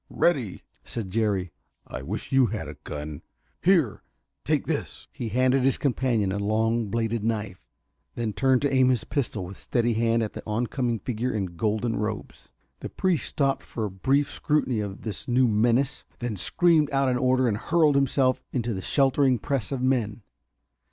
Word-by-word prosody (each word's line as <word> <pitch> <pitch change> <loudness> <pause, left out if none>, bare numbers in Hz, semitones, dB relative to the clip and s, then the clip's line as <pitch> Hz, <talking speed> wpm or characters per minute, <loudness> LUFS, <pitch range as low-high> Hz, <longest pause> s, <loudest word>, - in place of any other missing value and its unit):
"Ready!" 130 - 0 0.2
said 105 -6 -5
Jerry. 100 -5 0 0.3
"I - - -7
wish 100 +10 -5
you 135 -2 +5
had 105 -7 -4
a 75 - -6
gun! 75 0 -6 0.4
Here! 165 - +3 0.4
Take - - 0
this!" - - -3
He 115 - -5
handed 130 +4 +3
his 135 0 +3
companion 120 -7 +1
a 100 - -2
long 110 +2 +1
bladed 115 +1 -1
knife, 110 -4 -2 0.5
then 115 -3 -2
turned 130 +4 +2
to 140 -1 +1
aim 130 -1 +5
his 125 -4 +1
pistol 115 -9 -2
with 95 +2 -9
steady 120 -1 0
hand 115 +1 +2
at 110 - -4
the - - -6
oncoming 120 +2 -1
figure 125 +2 -2
in 95 -5 -3
golden 110 +5 0
robes. 105 0 -5 0.3
The - - -6
priest 185 -4 0
stopped 135 -3 0
for 110 - -4
a 105 - -4
brief 135 +9 +1
scrutiny 150 -7 0
of 100 -1 -5
this 105 -4 -5
new 125 +1 +3
menace, 120 +6 +2
then 120 -3 -3
screamed 155 - +3
out 135 -1 +1
an 125 -1 +2
order 130 0 +3
and 105 -3 0
hurled 155 +4 +3
himself 135 -2 +2
into 120 -2 -1
the 95 - -4
sheltering 135 +1 +3
press 135 -1 -2
of 130 -2 -2
men. 115 -5 0
120 Hz, 175 wpm, -26 LUFS, 105-135 Hz, 0.5 s, you